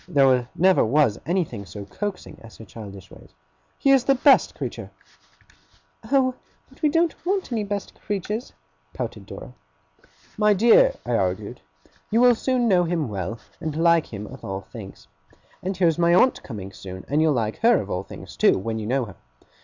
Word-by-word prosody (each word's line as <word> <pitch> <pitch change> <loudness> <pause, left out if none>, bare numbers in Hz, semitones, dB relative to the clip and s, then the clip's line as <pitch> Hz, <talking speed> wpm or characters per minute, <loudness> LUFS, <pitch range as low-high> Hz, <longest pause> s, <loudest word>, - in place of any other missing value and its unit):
(There 135 -6 +3
never 185 +2 +4
was 120 -3 +2
anything 165 - -1
so 100 +3 -8
coaxing 200 - -6
as 115 - -14
her 110 - -11
childish 100 -3 -11
ways.) - - -16 0.4
'He 275 - +3
is 270 -3 +5
the 275 - +4
best 270 +1 +4
creature!' - - -6 1.2
'Oh, 265 -2 +3 0.3
but - - -22
we 305 - +3
don't 330 +2 0
want 380 -4 -1
any 225 -3 -1
best 200 -1 -4
creatures!' 210 +4 -4 0.4
pouted - - -5
Dora. - - -9 0.9
'My 210 -1 +4
dear,' 240 - +5
I - - -3
argued, - - -2 0.5
'you 225 - +2
will 245 0 +7
soon 245 +1 0
know 185 -4 +4
him 165 -6 -1
well, 100 +2 -4 0.2
and 155 -3 -4
like 170 0 +3
him 105 -1 -6
of 130 +5 -11
all 95 0 -4
things. 100 0 -11 0.5
And 190 0 -3
here 180 -2 +3
is 165 +1 +1
my 170 0 +4
aunt 255 +8 +4
coming 100 -5 -8
soon; 95 -1 -9
and 145 +3 +1
you'll 160 -1 +3
like 110 -4 -2
her 235 +2 +4
of 100 -1 -6
all 90 - -1
things - - -11
too, - - +4
when 110 +4 -3
you 105 - -5
know 130 +1 0
her. 100 - -12
165 Hz, 185 wpm, -23 LUFS, -, 1.2 s, will